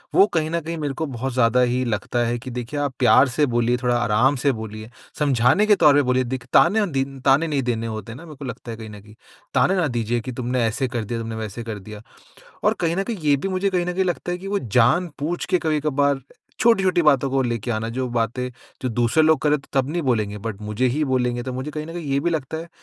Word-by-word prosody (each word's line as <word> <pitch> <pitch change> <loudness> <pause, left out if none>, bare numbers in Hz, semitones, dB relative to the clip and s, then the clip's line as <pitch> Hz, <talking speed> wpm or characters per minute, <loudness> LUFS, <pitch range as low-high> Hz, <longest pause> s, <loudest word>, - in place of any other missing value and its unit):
वो 195 - +8
कहीं 160 -2 +1
न 170 - 0
कहीं 165 +1 -5
मेरे 145 -3 -2
को 160 +4 -3
बहुत 130 -2 -4
ज़्यादा 125 0 +3
ही 125 +1 +1
लगता 115 +2 -2
है 120 +1 -1
कि 130 +1 -8
देखिए 125 +4 -4
आप 145 -2 -1
प्यार 130 +1 +6
से 145 +4 +2
बोलिए, 120 -1 +1
थोड़ा 125 0 0
आराम 120 +4 +2
से 140 +2 +2
बोलिए, 110 -2 -7 0.3
समझाने 140 - +3
के 210 -1 +5
तौर 150 -6 +5
पे 145 - +5
बोलिए 130 0 +2
दिख 125 -1 -5
ताने 210 +5 +5
दीन 135 0 -2
ताने 140 +5 +3
नहीं 145 -3 0
देने 115 -2 -1
होते 110 +1 -6
ना 155 +7 -11
मेरे 155 -3 -11
को 140 0 -8
लगता 125 -1 -7
है 115 - -7
कहीं 110 -1 -8
न 105 -1 -11
कहीं। 105 +1 -17 0.4
ताने 140 +9 +3
ना 180 -4 +1
दीजिए 115 +1 0
कि 130 - -6
तुमने 125 0 -1
ऐसे 125 +4 -1
कर 120 -2 -3
दिया, 115 +2 -3
तुमने 115 0 -5
वैसे 110 +1 -5
कर 110 -2 -6
दिया। 105 +2 -10 0.6
और - - +4
कहीं 165 -1 +1
न 195 - 0
कहीं 230 +1 -4
ये 145 - +6
भी 155 - -3
मुझे 190 +1 0
कहीं 180 -2 0
न 180 - -2
कहीं 190 +1 +1
लगता 175 0 -2
है 175 - -2
कि 190 +2 -9
वो 200 0 0
जानबूझ 150 - +1
के 180 - +2
कभी-कभार 145 -3 +1 0.4
छोटी-छोटी 195 -6 +3
बातों 140 -3 +3
को 135 0 +1
लेके 120 -1 -2
आना 110 0 -2
जो 130 0 -1
बातें 120 +2 -1 0.3
जो 130 - -1
दूसरे 120 +6 +2
लोग 155 0 +4
कर 150 - +2
रहे 150 - +3
थे - - -21
तब 135 0 +1
नहीं 170 +3 -1
बोलेंगे 110 -7 0
बट 105 -2 -4
मुझे 105 +4 -1
ही 155 +2 0
बोलेंगे। 125 -2 0
तो 130 - -4
मुझे 130 +4 -4
कहीं 150 0 -5
न 165 - -8
कहीं 170 -2 -6
ये 135 - +2
भी 160 - 0
लगता 160 -2 -3
है 165 +1 -7
130 Hz, 260 wpm, -22 LUFS, 120-155 Hz, 0.6 s, वो